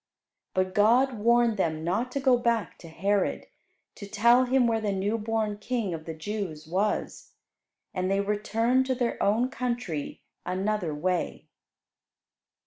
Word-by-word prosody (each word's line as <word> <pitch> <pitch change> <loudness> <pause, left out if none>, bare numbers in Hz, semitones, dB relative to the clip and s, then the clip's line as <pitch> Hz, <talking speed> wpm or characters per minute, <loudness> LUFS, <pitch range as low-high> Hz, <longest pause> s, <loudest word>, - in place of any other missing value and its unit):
But 185 0 0
God 235 +4 +3
warned 235 0 +3
them 160 -4 -1
not 215 +9 -1
to 275 - -1
go 265 -2 +4
back 235 -4 -1
to 170 - -11
Herod, 195 +5 -1 0.5
to 200 - -9
tell 235 +5 +4
him 255 0 +3
where 225 -1 +1
the 210 -2 -1
new 195 +3 -1
born 215 -1 -2
King 225 -5 -2
of 160 -1 -6
the 160 - -6
Jews 165 -3 -5
was, 195 +6 -2 0.6
and 185 -1 -1
they 195 0 +1
returned 225 +5 +1
to 260 - +1
their 245 -2 -2
own 225 +5 +2
country 240 - -4 0.2
another 190 -1 -1
way. 180 +4 -2
210 Hz, 145 wpm, -27 LUFS, 185-235 Hz, 0.6 s, go